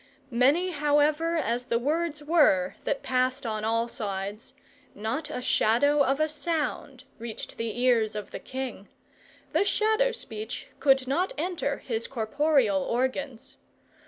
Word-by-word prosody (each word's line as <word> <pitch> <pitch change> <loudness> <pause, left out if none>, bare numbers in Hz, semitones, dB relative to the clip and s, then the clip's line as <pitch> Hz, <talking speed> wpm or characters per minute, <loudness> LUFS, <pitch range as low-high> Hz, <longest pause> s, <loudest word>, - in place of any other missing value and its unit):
Many, 280 +10 +3
however, 300 +2 +2
as 245 -4 -1
the 235 - +2
words 300 +4 -1
were 295 - +4
that 280 - -1
passed 255 -1 0
on 215 -2 -2
all 230 +1 +1
sides, 205 -1 -5 0.4
not 245 +9 -3
a 250 -5 -4
shadow 285 +6 +3
of 270 +1 +1
a 310 - +3
sound 300 -4 -3 0.2
reached 230 -1 -7
the 230 +1 -3
ears 230 -4 +3
of 210 -2 -6
the - - -6
king: 260 -6 -6 0.7
the - - +4
shadow 440 +4 +2
speech 220 - -7
could 270 -2 +4
not 345 +8 0
enter 320 -3 -1
his 230 -2 -3
corporeal 250 -3 +2
organs. 260 +2 -2
265 Hz, 135 wpm, -27 LUFS, 230-300 Hz, 0.7 s, were